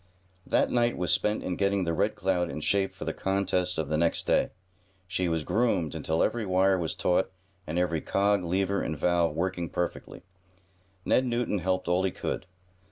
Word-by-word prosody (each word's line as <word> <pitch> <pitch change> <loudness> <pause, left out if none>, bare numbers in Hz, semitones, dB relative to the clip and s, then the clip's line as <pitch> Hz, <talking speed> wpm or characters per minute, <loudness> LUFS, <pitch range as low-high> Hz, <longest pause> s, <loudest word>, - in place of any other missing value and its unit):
That - - +2
night 120 -1 +2
was 90 0 0
spent 105 0 +1
in 90 - -2
getting 100 -1 +1
the 85 -1 -1
Red 80 - +1
Cloud 90 -2 0
in - - -5
shape 100 +4 +1
for - - -8
the - - -2
contests 95 -2 0
of 80 -2 -1
the 75 +1 0
next 85 0 +1
day. - - +2 0.6
She 90 -2 -1
was 80 -2 0
"groomed" 90 - +1
until 80 +1 0
every 120 -1 0
wire 95 -1 +3
was 80 -2 -2
taut 90 +1 +1 0.4
and 80 +3 -3
every 85 -3 +1
cog, 100 -1 +1
lever 95 +3 0
and 80 - -3
valve 85 -1 +2
working 85 0 -2
perfectly. 90 - -4 0.8
Ned 130 - +3
Newton 120 -4 0
helped 95 +1 -1
all 90 +1 +2
he 95 - +2
could. 95 - -4
90 Hz, 185 wpm, -28 LUFS, 85-100 Hz, 0.8 s, wire